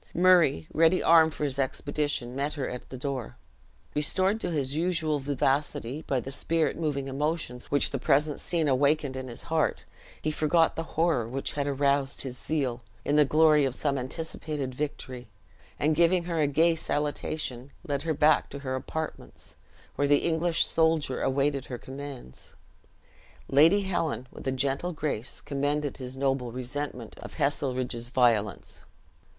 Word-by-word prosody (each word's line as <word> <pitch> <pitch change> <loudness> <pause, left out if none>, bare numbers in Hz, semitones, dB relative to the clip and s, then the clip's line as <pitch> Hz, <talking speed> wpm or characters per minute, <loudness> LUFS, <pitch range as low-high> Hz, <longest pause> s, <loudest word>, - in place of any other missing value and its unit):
Murray, 175 - +4
ready 165 +3 +4
armed 160 -1 +5
for - - -4
his 140 -1 -2
expedition, 140 -1 -2
met 140 +2 -1
her 140 -4 -3
at 125 - -7
the 130 - -7
door. 130 -2 -4 0.6
Restored 190 +8 +2
to 180 - -1
his 145 -4 -2
usual 160 -3 0
vivacity 140 0 -1
by 135 -4 -1
the 135 - -7
spirit 160 +3 0
moving 145 -4 -2
emotions 140 -2 -2
which 145 - +4
the 135 - -2
present 145 +3 +2
scene 165 -3 0
awakened 140 +1 +2
in 130 0 -5
his 120 - -8
heart, 160 -2 0 0.3
he 155 - -1
forgot 160 +2 +2
the - - -2 0.2
horror 160 -9 +2
which 135 +2 -2
had 145 -1 -1
aroused 140 0 +1
his 130 -2 -6
zeal, 130 -4 -2 0.2
in 145 - +1
the 150 -1 +6
glory 155 0 +5
of 130 -2 0
some 140 0 0
anticipated 140 0 -4
victory; 130 -3 -5 0.5
and 155 +1 +2
giving 170 +2 +3
her 170 -1 -2
a 150 - +3
gay 160 +4 +4
salutation, 145 -4 -3 0.2
led 140 -2 -1
her 160 -1 -1
back 150 +1 +3
to 140 - -7
her 130 - -2
apartments, 130 - -5 0.4
where 145 - +2
the 145 0 +3
English 170 0 +2
soldier 160 -5 +1
awaited 140 0 0
her 125 - -5
commands. 135 - -10 0.9
Lady 160 +9 +5
Helen, 170 -9 -2
with - - -9
a - - +2
gentle 140 +6 -1
grace, 140 -6 -3
commended 145 0 -2
his 130 0 -5
noble 135 -3 0
resentment 125 -1 -5
of - - -9
Heselrigge's 130 -4 -1
violence. 115 -6 +1
145 Hz, 155 wpm, -28 LUFS, 130-155 Hz, 0.9 s, the